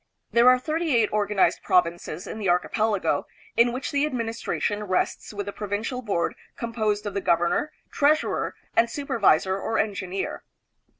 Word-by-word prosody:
There 235 +1 +6
are 255 - +6
thirty 310 +2 -1
eight 225 -3 +3
organized 210 -2 +2
provinces 175 -2 0
in 220 - -6
the 200 -4 0
archipelago, 205 +4 +1 0.3
in 235 +1 +5
which 255 +3 -4
the 285 0 +1
ad 300 -3 -1
ministration 225 -2 -2
rests 185 -2 -1
with 205 -1 -4
the 200 - -5
Provincial 215 +5 -3
Board 200 -7 -1 0.2
composed 215 -3 -1
of 205 - -3
the 200 - -1
governor, 175 - +1 0.2
treasurer, 300 +2 +1 0.2
and 230 0 +4
supervisor 195 - +2
or 225 - -2
engineer. 195 -3 -2
215 Hz, 155 wpm, -25 LUFS, 195-240 Hz, 0.3 s, There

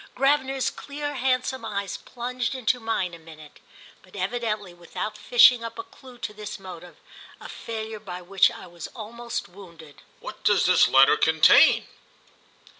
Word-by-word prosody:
Gravener's 270 0 +1
clear 290 0 -6
handsome 260 -1 -1
eyes 200 -3 -4
plunged 250 +1 -4
into 250 0 0
mine 225 -6 -2
a 170 - -10
minute, 155 -2 -15 0.4
but 185 - -19
evidently 210 -1 -3
without 175 +5 -6
fishing 240 +2 +5
up 230 0 -7
a 380 - -5
clue 265 -10 -16
to 220 -3 -6
this 210 0 -7
motive—a 180 -2 -13
failure 220 -1 -6
by 180 -4 -8
which 190 +2 +3
I - - -10
was 170 -2 -9
almost 235 +1 -6
wounded. 170 -5 -15 0.2
"What - - -10
does - - +3
the - - +4
letter - - +6
contain?" - - +5
220 Hz, 145 wpm, -25 LUFS, 185-250 Hz, 0.4 s, letter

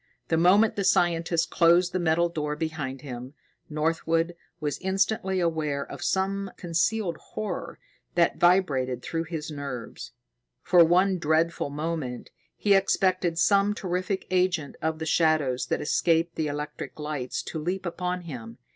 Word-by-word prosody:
The 165 - +2
moment 195 +6 +5
the 200 - 0
scientist 170 -2 +2
closed 175 +2 +4
the 185 - 0
metal 170 0 +2
door 150 -3 -3
behind 150 -5 -4
them, 130 0 -8 0.3
Northwood 165 +2 0 0.2
was 150 -2 -2
instantly 190 0 0
aware 155 -5 0
of - - -8
some 195 +1 0
concealed 175 +1 0
horror 210 -5 -6 0.4
that 170 -1 +2
vibrated 140 -9 +2
through 165 0 -2
his 160 -2 -5
nerves. 140 -5 -7 0.5
For 175 -2 +6
one 180 +3 +3
dreadful 160 0 +1
moment, 150 -4 -4 0.3
he 205 - +3
expected 185 -3 +2
some 200 +4 +3
terrific 185 +1 -2
agent 180 -5 +1
of 160 0 -1
the 160 - -4
shadows 150 -6 +2
that - - -1
escaped 165 +2 +1
the 160 -2 -2
electric 150 0 -5
lights 150 -4 -3
to 160 - -5
leap 180 +5 -3
upon 180 +1 -2
him. 120 -8 -8
165 Hz, 140 wpm, -26 LUFS, 150-180 Hz, 0.5 s, For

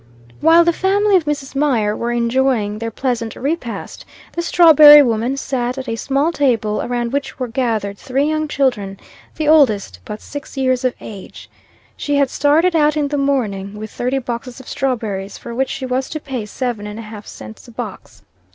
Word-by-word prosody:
While 330 +2 +6
the 340 - +3
family 400 +3 +2
of 350 -4 +3
Mrs. 285 -3 -3
Mier 240 -8 +1
were 235 +1 -2
enjoying 235 -3 0
their 230 0 -3
pleasant 230 -1 -3
repast, 275 -4 -4 0.3
the 340 - -2
strawberry 305 -4 +8
woman 235 +2 0
sat 250 -2 -2
at 265 0 -6
a 230 - -2
small 275 +7 0
table, 230 -9 0
around 240 0 -2
which 280 -1 -3
were 255 - -3
gathered 225 -5 -2
three 270 +1 -1
young 310 0 -1
children, 235 -10 -1 0.4
the 310 - -2
oldest 220 - +3
but 210 - -7
six 285 -1 -9
years 255 -1 +1
of 255 -1 0
age. 200 -3 -10 0.4
She 290 - -2
had 280 -2 +2
started 320 +5 +2
out 300 -1 +3
in 290 -2 0
the 295 - -2
morning 210 -8 -1
with 215 0 -7
thirty 250 +2 -2
boxes 245 0 -5
of 260 - -13
strawberries, 220 -8 -3
for 235 - -8
which 265 +3 -1
she 265 - -4
was 255 +1 -2
to 310 - -4
pay 255 -7 -5
seven 230 -2 -4
and 210 +1 -7
a 230 - -7
half 215 -1 -10
cents 110 - -11
a - - -12
box. - - -8
255 Hz, 190 wpm, -18 LUFS, 225-285 Hz, 0.4 s, strawberry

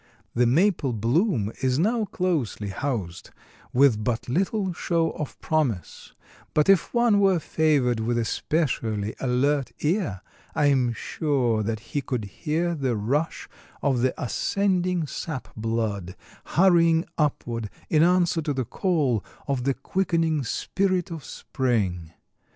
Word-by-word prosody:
The 120 0 +3
maple 155 - +2
bloom 115 - +1
is 130 -1 +1
now 220 +7 +1
closely 155 - -1
housed, 100 -6 -4 0.4
with 125 -5 +4
but 120 0 -1
little 190 - 0
show 165 -1 0
of 150 - -6
promise, 135 - -2 0.4
but 150 - +3
if 195 -3 +4
one 235 -4 +3
were 195 -2 +4
favored 145 -7 +1
with 120 +2 0
a 115 - 0
specially 110 -9 -1
alert 135 +2 +1
ear, 155 - 0 0.3
I 150 - +2
am 125 -3 +2
sure 125 -5 0
that 110 0 -2
he 145 - +1
could 125 -5 -3
hear 165 - -2
the 135 -6 -1
rush 140 +10 -1 0.4
of 130 -4 +2
the 130 +1 0
ascending 180 +4 0
sap 150 -1 -5
blood, 110 -5 -2 0.3
hurrying 170 -2 +4
upward 120 -7 -1 0.2
in 155 - +3
answer 175 -1 +3
to 150 -1 -1
the 130 -2 -1
call 140 - 0 0.2
of 135 -3 -1
the 135 -1 +1
quickening 165 -1 0
Spirit 185 - -1
of 160 -4 -6
Spring. 100 - -2
140 Hz, 135 wpm, -25 LUFS, 115-170 Hz, 0.4 s, with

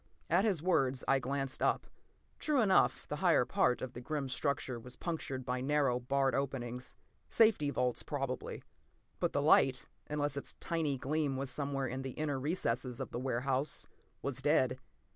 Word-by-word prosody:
p> - - -35 0.3
At 190 +4 +4
his 185 -8 +1
words, 135 -8 +2
I 135 - +4
glanced 135 +1 -2
up. - - +2 0.5
True 300 -3 +1
enough, 195 -4 +3
the 150 - -3
higher 165 -7 +4
part 125 0 +2
of 130 -1 -5
the 120 - -7
grim 140 0 -3
structure 130 -2 -1
was 125 +2 -11
punctured 140 -6 -4
by 125 0 -1
narrow, 135 -2 +2
barred 135 +2 +1
openings. 125 -3 -3 0.3
Safety 215 -11 +4
vaults, 125 -3 0
probably. 135 -3 -4 0.6
But - - +1
the - - +1
light, - - +5 0.2
unless 145 -1 -1
its 140 - -4
tiny 155 -5 -1
gleam 140 +1 -1
was 135 0 -3
somewhere 140 -2 -2
in 130 +1 -3
the 135 -1 -5
inner 145 -3 -2
recesses 130 -5 -1
of - - -5
the - - -3
warehouse, 130 +2 0 0.4
was 135 -2 -2
dead. 130 -3 +2
135 Hz, 170 wpm, -34 LUFS, 130-150 Hz, 0.6 s, light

